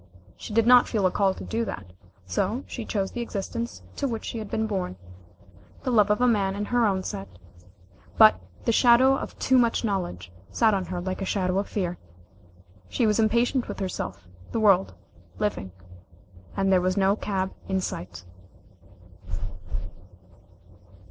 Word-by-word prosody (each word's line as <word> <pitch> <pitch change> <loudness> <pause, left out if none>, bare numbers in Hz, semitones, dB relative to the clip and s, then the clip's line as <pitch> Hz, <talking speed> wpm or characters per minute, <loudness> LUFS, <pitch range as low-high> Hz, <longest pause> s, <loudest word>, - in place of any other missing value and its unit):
She - - -9
did 225 +1 +3
not 245 0 +7
feel 210 -5 0
a 185 - +3
call 195 -1 +2
to - - -8
do 230 +1 -2
that, 90 - -7 0.3
so 185 - -1
she 235 - -6
chose 195 -3 -2
the 240 - -4
existence 230 +1 -4
to 280 - 0
which 230 -3 -4
she 230 - -4
had 215 -2 -6
been 220 - 0
born; 190 - -2 0.9
the 255 - -1
love 210 -3 +4
of 210 - +2
a 250 - +4
man 200 -4 +2
in 205 +1 -2
her 240 0 +2
own 190 -2 0
set, 95 - -5 0.9
but 95 -4 +7 0.2
the - - +3
shadow 250 +3 +6
of - - -6
too 260 -1 +3
much 235 -1 +2
knowledge 175 - -3 0.2
sat 225 -2 +3
on 190 -2 0
her 180 +1 -4
like 185 +2 -4
a - - 0
shadow 185 -1 0
of 200 - -3
fear. 180 -4 -2 0.9
She 235 - +1
was 215 0 +2
impatient 235 +3 +2
with - - -6
herself, 95 - -4 0.3
the - - -1
world, 195 -3 +4 0.4
living, 205 - -2 0.9
and 195 0 +2
there 185 - +4
was 185 +2 0
no 195 0 +3
cab 190 -3 -2 0.2
in 190 0 +1
sight. 90 - -6
200 Hz, 170 wpm, -26 LUFS, 185-230 Hz, 0.9 s, not